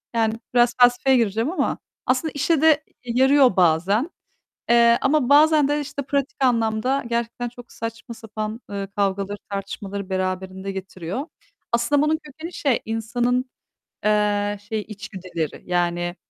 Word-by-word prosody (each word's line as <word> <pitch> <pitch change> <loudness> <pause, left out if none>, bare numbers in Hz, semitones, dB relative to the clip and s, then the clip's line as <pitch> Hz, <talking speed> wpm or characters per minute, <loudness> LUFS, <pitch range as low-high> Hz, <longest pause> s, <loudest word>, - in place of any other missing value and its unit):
yani 225 -1 +2 0.2
biraz 240 0 +4
felsefeye 245 +2 +5
gireceğim 225 +4 0
ama 370 - -1 0.3
aslında 260 +5 +1
işe 295 +2 +1
de 320 - +5 0.4
e 245 - -4
yarıyor 265 -2 +5
bazen, 185 - +2 0.6
eee, 235 0 +6
ama 275 -2 +2
bazen 300 0 +6
de 290 +1 +1
işte 285 0 -5
pratik 280 0 -2
anlamda 235 +2 +1
gerçekten 235 +1 -2
çok 245 0 -14
saçma 230 +1 -7
sapan, 215 +1 -6
ııı, 200 -1 -4
kavgaları 200 0 -1
tartışmaları 200 0 -5
beraberinde 185 +1 -3
getiriyor. 190 - -5 0.4
Aslında 240 +5 +2
bunun 305 +1 +2
kökeni 315 +4 -9
şey 275 -7 +1
insanın, 240 +3 0 0.6
eee, 205 -1 +1
şey 220 -2 -1
içgüdüleri. 185 -6 -6
Yani, 175 0 -1
230 Hz, 135 wpm, -23 LUFS, 200-265 Hz, 0.6 s, eee